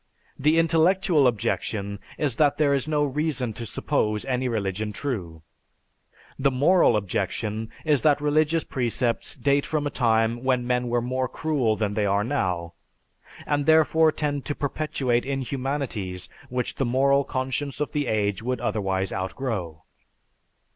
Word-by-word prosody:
The 150 +4 +3
intellectual 165 -2 +3
objection 100 -2 -2 0.2
is 140 -6 0
that 145 -2 +3
there 145 -2 +3
is 140 +1 0
no 150 -1 +1
reason 135 -4 -2
to 115 +1 -6
suppose 105 0 -1
any 130 -1 -1
religion 105 -2 -2
true; 90 - -5 1.0
the 140 +1 +3
moral 140 - +4
objection 105 +3 -2 0.2
is 150 -4 +3
that 150 -2 +4
religious 155 +2 +2
precepts 120 -1 -1
date 140 0 +2
from 150 -2 -2
a 145 - -1
time 115 -1 +1
when 130 -2 +1
men 125 0 0
were 120 0 0
more 130 +1 -1
cruel 135 -8 0
than 105 -2 -1
they 105 -1 0
are 100 +1 +2
now, 90 -10 -2 0.7
and 145 -1 0
therefore 160 0 +5
tend 145 -3 -2
to 145 - -2
perpetuate 135 -4 -1
inhumanities 130 -8 -3 0.2
which 125 0 -2
the - - +1
moral 140 +3 +3
conscience 135 +2 -3
of 150 - -2
the 145 -3 -1
age 105 -2 0
would 125 +1 -2
otherwise 95 -3 -1
outgrow." 95 - -4
130 Hz, 145 wpm, -25 LUFS, 110-145 Hz, 1.0 s, therefore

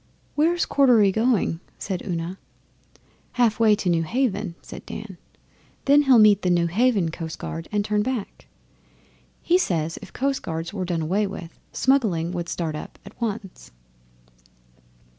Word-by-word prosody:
'Where's 335 +4 +2
Cordery 240 -8 +4
going?' 220 -6 +1 0.2
said 190 -3 -4
Una. 175 0 -4 0.9
'Half 235 -3 +2
way 220 -2 +5
to 205 - -4
Newhaven,' 190 +2 0
said - - -10
Dan. 200 -5 -8 0.7
'Then 285 +1 +6
he'll 270 -4 +5
meet 210 -2 +6
the 180 - 0
Newhaven 175 +2 +2
coastguard 165 0 -6
and 205 -1 0
turn 210 0 +1
back. 240 -2 -4 1.0
He 355 +2 +3
says 165 - -1
if - - -11
coastguards 170 -12 -3
were 190 -3 -3
done 170 -2 -1
away 200 +6 +1
with, 180 -4 -9
smuggling 210 -12 +1
would 175 -2 -4
start 165 -3 -2
up 150 - -8
at - - -14
once. 215 -4 -5
200 Hz, 135 wpm, -24 LUFS, 170-235 Hz, 1.0 s, Then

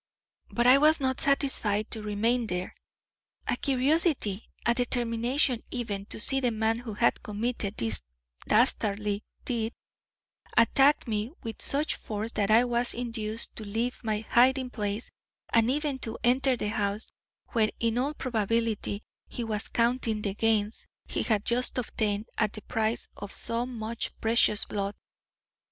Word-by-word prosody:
"But 240 - 0
I 255 +2 +8
was 310 +2 +5
not 260 -1 0
satisfied 265 -8 +1
to 220 - -3
remain 225 +3 +1
there. 180 -2 -3 0.7
A - - +1
curiosity, 270 - +1 0.2
a 235 - +4
determination 245 +1 +1
even, 205 -5 -3
to - - -6
see 270 +4 +5
the 250 -2 +2
man 225 0 0
who 230 -4 -7
had 235 +3 +2
committed 215 -1 -2
this 110 - 0 0.5
dastardly 210 -3 +2 0.2
deed, 230 -2 -1 0.8
attacked 270 +5 +5
me 215 0 -1
with 225 -1 -6
such 290 +3 0
force 215 +1 -4
that 205 -1 0
I 225 +3 +6
was 240 0 0
induced 230 -2 -2
to 220 - -4
leave 225 +5 -2
my 215 -1 -1
hiding 255 +1 +4
place 210 0 -3 0.4
and 230 0 +4
even 285 0 0
to 225 -3 -4
enter 255 +1 +3
the 210 - -2
house 210 0 -1 0.4
where 220 -3 +2
in 230 +1 +1
all 285 +4 -1
probability 225 -3 -1 0.2
he 240 - -4
was 215 -1 -2
counting 230 -2 +1
the 200 - -1
gains 215 0 0 0.2
he - - -2
had 215 -3 +1
just 245 +2 0
obtained 215 -3 -1
at 215 -2 +1
the 215 - -7
price 220 +1 -1
of 200 -1 -7
so 230 +1 -1
much 230 -2 -4
precious 225 -2 +3
blood. 200 0 -3
230 Hz, 150 wpm, -28 LUFS, 215-250 Hz, 0.8 s, I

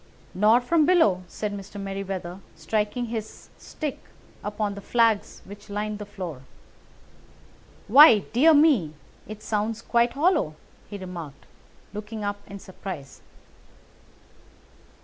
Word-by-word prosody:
"Nor 215 +5 +4
from 310 +4 +2
below," 215 - +4
said 210 +3 -4
Mr. 200 0 -8
Merryweather, 195 -2 -5 0.2
striking 210 +9 -2
his 220 -2 -7
stick 300 -3 -5 0.4
upon 210 0 -2
the 200 - -8
flags 225 0 +1
which 205 +2 -12
lined 210 +1 -3
the 210 - -7
floor. 180 -9 -7 1.5
"Why, 265 +1 +9 0.2
dear 305 +7 +6
me, 265 - +4 0.3
it 215 0 -9
sounds 220 +1 -2
quite 235 0 +2
hollow!" 290 - +1 0.3
he 205 - -6
remarked, 175 -6 -9 0.5
looking 210 +1 -6
up 205 0 -3
in 200 - -7
surprise. 185 -7 -9
210 Hz, 115 wpm, -25 LUFS, 195-230 Hz, 1.5 s, Why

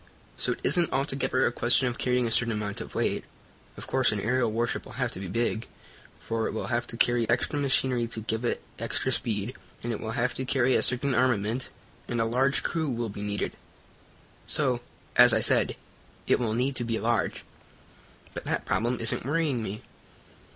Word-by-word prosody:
So - - 0
it - - -11
isn't 175 -2 +2
altogether 135 -1 +1
a - - +2
question 125 +2 +4
of 120 - -4
carrying 125 -1 +1
a 115 - -2
certain 115 +1 +3
amount 105 -1 -3
of - - -9
weight. - - 0 0.5
Of - - -7
course, 130 -1 +3
an 105 - -2
aerial 120 +2 +1
warship 115 +2 -1
will - - -12
have - - -1
to - - -7
be 95 - -5
big, 115 +3 -1 0.5
for 115 -1 -2
it - - -4
will 110 - -3
have 120 0 -1
to 115 - -5
carry 120 -1 +3
extra 125 +5 +1
machinery 130 -3 +2
to 115 -1 -3
give 110 +2 -2
it 120 - -1 0.2
extra - - -1
speed, 110 +1 -2 0.3
and 120 0 -2
it 105 - -4
will 110 0 -4
have 125 +1 0
to 130 - -3
carry 130 0 +2
a - - +3
certain 125 +4 +2
armament, 120 -1 +1 0.4
and 120 - -2
a 115 - +3
large 130 +4 +1
crew 160 -3 -1
will 120 -2 -2
be 100 0 -7
needed. 105 0 -2 1.0
So, 130 -5 +1 0.3
as 125 -1 +8
I - - +3
said, - - +3 0.5
it - - +3
will 110 -3 -1
need 130 +3 0
to 120 - -2
be 115 -1 -2
large. 115 +2 0 0.9
But - - -7
that - - -2
problem 120 +2 0
isn't 115 - +4
worrying 145 -2 0
me." 105 -1 -5
120 Hz, 200 wpm, -27 LUFS, 110-130 Hz, 1.0 s, as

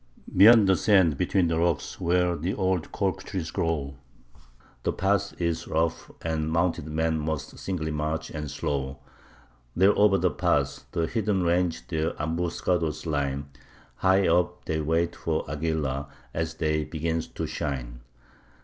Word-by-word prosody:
Beyond 105 +2 +8
the 95 - +5
sands, 95 -5 +4
between 90 +5 +1
the 80 0 0
rocks, 85 +1 -1
where 90 0 +2
the 85 +6 -2
old 95 -4 0
cork 95 -1 -1
trees 90 -5 -4
grow, 70 -4 -2 0.8
The - - 0
path 100 0 0
is 85 -2 -1
rough, 80 +1 -1
and 80 -1 -1
mounted 85 -2 0
men 80 +1 0
must 75 -2 -4
singly 80 -5 -3
march 75 +1 -2
and 75 -2 -5
slow; 70 -1 -3 0.8
There 95 +4 +5
o'er 100 -1 +5
the 90 -1 +1
path - - 0
the 85 - 0
heathen 105 -2 0
range 85 0 0
their 80 -1 -1
ambuscado's 80 0 -1
line, 70 -2 -2 0.5
High 95 +1 +3
up 90 +1 +1
they 80 0 -1
wait 80 +3 0
for 80 -1 -2
Aguilar, 75 -2 -2 0.3
as 80 0 -2
the 80 - -3
day 75 0 +1
begins 80 +1 -2
to - - -5
shine. 60 -4 -4
80 Hz, 150 wpm, -26 LUFS, 75-90 Hz, 0.8 s, Beyond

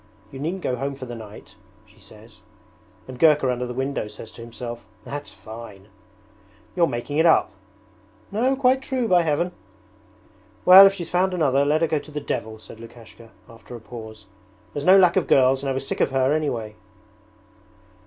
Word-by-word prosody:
You 135 - -9
needn't 175 +6 -4
go 125 - -2
home 140 +2 -4
for 135 -1 -8
the 120 - -8
night," 105 -3 -12 0.3
she 105 +1 -24
says. 110 +1 -16 0.7
And 130 -1 -10
Gurka 150 -5 +4
under 125 0 -3
the 125 - -6
window 135 -3 -3
says 110 +1 -11
to - - -13
himself, 120 0 -8 0.2
"That's 145 0 -7
fine!"' 105 -1 -12 0.9
'You're 170 -2 +3
making 120 +4 -4
it 160 - +4
up.' 165 - +3 0.8
'No, 250 +6 +1
quite 260 0 +2
true, 260 -3 -2
by 180 -4 +4
Heaven!' 165 +2 -1 1.1
'Well, 190 +2 +10
if 195 - 0
she's 175 -4 -7
found 185 +1 +1
another 140 -5 +2
let 150 +2 +1
her 165 - +2
go 155 -1 0
to 155 - -14
the 150 - -4
devil,' 110 -6 -5
said 110 +1 -14
Lukashka, 115 0 -14 0.2
after 115 +1 -13
a - - -9
pause. 110 -2 -11 0.5
'There's 145 0 -5
no 190 +1 +7
lack 180 -1 +4
of 185 - +1
girls 130 0 +3
and 140 - -3
I - - 0
was 135 +1 -4
sick - - -3
of - - +2
her 135 +1 +1
anyway.' 120 -9 -2
135 Hz, 185 wpm, -23 LUFS, 115-165 Hz, 1.1 s, Well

